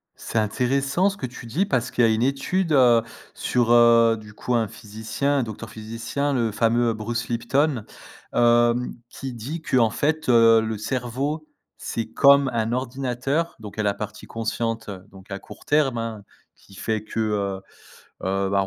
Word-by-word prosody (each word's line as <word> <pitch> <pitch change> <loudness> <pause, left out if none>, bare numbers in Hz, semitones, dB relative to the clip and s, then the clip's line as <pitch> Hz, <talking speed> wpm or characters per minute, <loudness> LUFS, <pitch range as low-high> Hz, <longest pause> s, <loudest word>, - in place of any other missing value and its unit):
C'est 115 - -5
intéressant 135 - +1
ce 200 - -7
que 130 - -4
tu 120 -1 -9
dis 160 - 0
parce 125 - 0
qu'il 120 - +1
y - - +6
a - - +3
une 110 - 0
étude, 140 +7 0
heu, 120 -4 +6 0.3
sur, 120 -2 0
heu, 115 -1 +6
du 105 -1 -12
coup 125 - -3
un 115 -2 +2
physicien, 110 +7 -2
un 130 - +1
docteur 110 0 -7
physicien, 115 +6 -3
le 115 -4 +1
fameux 115 +2 +2
Bruce 115 +2 -4
Lipton, 125 +2 0 0.5
heu, 120 0 +4 0.3
qui 135 -2 -7
dit 135 +9 -6
que, 130 - 0
en 115 -3 +4
fait 150 +6 -1
heu: 115 -1 +6
«Le 110 -1 -3
cerveau, 130 +7 -3 0.3
c'est 115 - -3
comme 140 0 +6
un 115 0 0
ordinateur» 130 +5 -2
donc 105 -2 -9
il - - -7
y - - +3
a - - -2
la 100 -1 +1
partie 105 0 -7
consciente, 115 0 -3 0.2
donc 95 +1 -16
à 100 - -4
court - - -14
terme, 145 -5 +2
hein, 115 -2 -4 0.3
qui 100 - -19
fait 110 +1 -2
que, 110 +1 -5
heu, 100 -3 -1 0.7
heu, 95 +1 0
bah 100 0 +2
120 Hz, 185 wpm, -24 LUFS, 110-135 Hz, 0.7 s, y